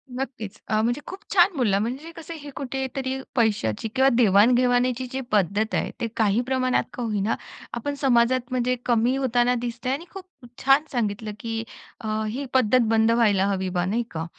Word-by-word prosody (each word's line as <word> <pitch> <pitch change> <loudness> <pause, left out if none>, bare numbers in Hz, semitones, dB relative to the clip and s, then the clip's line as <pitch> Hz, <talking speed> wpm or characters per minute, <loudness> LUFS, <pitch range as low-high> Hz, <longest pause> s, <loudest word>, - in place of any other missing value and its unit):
नक्कीच, 230 -6 -5
अ, 215 0 +1
म्हणजे 240 +5 0
खूप 380 - -7
छान! 370 -1 +5
बोलला 210 -7 +2
म्हणजे 260 +10 -4
कसं 330 0 -8
हे 290 - -8
कुठेतरी 265 0 -3 0.2
पैशाची 210 - +1
किंवा 265 +1 +5
देवाण-घेवाणीची 245 +3 +3
जी 265 - -3
पद्धत 210 +2 +1
आहे - - -1
ते 230 - 0
काही 215 0 +2
प्रमाणात 255 -1 +1
का 245 - -4
होईना 215 -1 0 0.4
आपण 240 +5 -3
समाजात 245 -1 +2
म्हणजे 250 0 +1
कमी 240 +1 +2
होताना 250 -2 +2
दिसतंय 240 +1 -3
आणि 305 +5 -5
खूप 385 -2 -8 0.4
छान 270 +2 +5
सांगितलं, 215 -3 -2
की 225 -1 -3 0.4
अ, 220 -2 -2
ही 265 +6 -4
पद्धत 255 -1 +4
बंद 225 0 +3
व्हायला 210 -5 +3
हवी 190 -2 -1
बा 180 -1 -1
नाही 220 +6 0
का? 160 0 -4
240 Hz, 170 wpm, -24 LUFS, 215-260 Hz, 0.4 s, छान